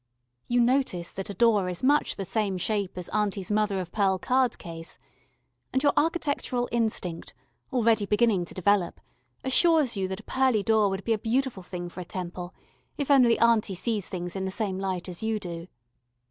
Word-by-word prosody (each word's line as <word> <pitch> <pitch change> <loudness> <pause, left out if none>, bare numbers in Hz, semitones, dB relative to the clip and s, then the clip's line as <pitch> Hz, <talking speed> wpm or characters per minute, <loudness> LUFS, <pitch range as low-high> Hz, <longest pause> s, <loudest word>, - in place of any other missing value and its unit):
You 245 0 +2
notice 240 -9 +1
that 195 +1 -5
a - - -4
door 210 -3 +3
is 180 +4 -4
much 290 +3 +3
the 195 - -4
same 200 -1 -1
shape 200 0 -1
as 180 - -4
auntie's 205 -2 -1
mother 210 -2 +1
of 175 -2 -5
pearl 195 -3 +2
card 255 +4 +1
case, 165 -1 -8 0.7
and 265 - 0
your 285 - +4
architectural 285 -6 0
instinct, 220 -7 -2 0.4
already 230 -5 +2
beginning 210 -4 +2
to - - -10
develop, 190 -1 +1 0.4
assures 295 -1 +4
you 190 -1 -1
that 190 0 -5
a - - -32
pearly 260 -6 +1
door 220 -2 +3
would 195 0 -4
be 230 - +1
a 215 - -1
beautiful 240 -1 -1
thing 175 0 -6
for 175 - -10
a - - -4
temple, 175 0 -6 0.5
if 285 -1 -1
only 250 -4 +6
auntie 230 -4 +3
sees 210 0 -2
things 175 -1 -5
in 190 - -2
the 190 - -2
same 190 -1 -2
light 190 -2 -3
as 180 -2 -6
you 220 -1 -1
do. 170 -2 -7
205 Hz, 190 wpm, -27 LUFS, 185-235 Hz, 0.7 s, only